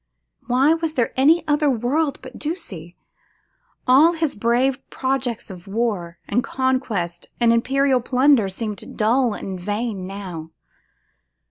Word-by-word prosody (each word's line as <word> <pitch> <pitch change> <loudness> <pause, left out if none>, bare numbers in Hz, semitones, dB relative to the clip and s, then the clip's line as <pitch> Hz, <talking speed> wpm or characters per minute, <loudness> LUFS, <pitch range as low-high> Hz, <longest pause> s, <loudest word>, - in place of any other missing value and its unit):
Why 265 +5 +4
was 325 -1 -2
there 240 -3 0
any 315 +5 +4
other 295 0 +2
world 275 +5 0
but 255 -1 -10
Ducie? 185 - -6 0.9
All 285 +7 +6
his 320 -3 -1
brave 245 +5 +1
projects 260 -5 -2
of 180 -1 -11
war, 195 -6 -2
and 245 - +1
conquest, 225 -10 -2
and 235 -1 +4
imperial 265 +2 +2
plunder, 255 -3 +3
seemed 210 +1 -6
dull 230 +1 +2
and 190 -2 -6
vain 205 0 -3
now. 185 -5 -7
245 Hz, 125 wpm, -22 LUFS, 205-275 Hz, 0.9 s, All